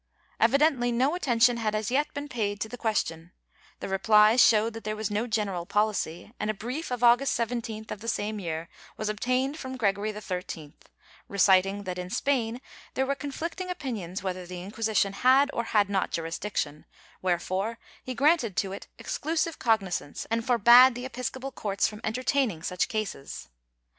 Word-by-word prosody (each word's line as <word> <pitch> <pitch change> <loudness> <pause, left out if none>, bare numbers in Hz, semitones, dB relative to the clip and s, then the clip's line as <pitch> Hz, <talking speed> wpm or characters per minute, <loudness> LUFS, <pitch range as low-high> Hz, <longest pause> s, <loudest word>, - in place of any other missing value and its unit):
^ - - -50 0.4
Evidently 275 -4 +3
no 260 +6 +2
attention 245 -8 +3
had 215 -2 -1
as 215 +1 -2
yet 290 +3 +1
been 285 +1 -4
paid 210 -6 -2
to 220 - -2
the 245 - -7
question; 180 -8 -2 0.5
the - - -4
replies 210 +4 +5
showed 220 0 +4
that 225 - -8
there 215 0 -3
was 215 -1 -3
no 215 +4 -1
general 200 -6 -2
policy, 210 -3 -1
and 210 - -2
a 215 - 0
brief 250 +11 -5
of 245 -1 -3
August 245 +3 +5
17th, 230 -2 -3
of - - -5
the 230 - -8
same 215 -1 -2
year, 165 -3 -4 0.3
was 215 - -2
obtained 255 +7 -1
from 260 -1 -6
Gregory 205 -2 0
XIII 180 -7 -6 0.5
reciting 195 0 +3
that 180 -1 -4
in 180 0 -5
Spain 245 0 0 0.3
tiiere 265 - +1
were 280 - 0
conflicting 330 +6 -5
opinions 220 - -4
w^iether 185 -2 -4
the 180 0 -7
Inquisition 210 0 0
had 265 +6 +4
or 235 - -1
had 210 -3 +2
not 195 -1 0
jurisdiction, 165 -2 -3 0.4
wherefore 185 +5 -1 0.3
he 255 - -5
granted 275 - +2
to 195 - 0
it 195 - -8
exclusive 325 +1 -2
cognizance, 195 - 0
and 230 0 +1
forbade 245 +1 +7
the 245 +1 -5
episcopal 260 +1 -5
courts 200 -5 0
from 210 0 -8
entertaining 250 - 0
such 180 0 0
cases. 210 - -5
220 Hz, 170 wpm, -27 LUFS, 195-250 Hz, 0.5 s, forbade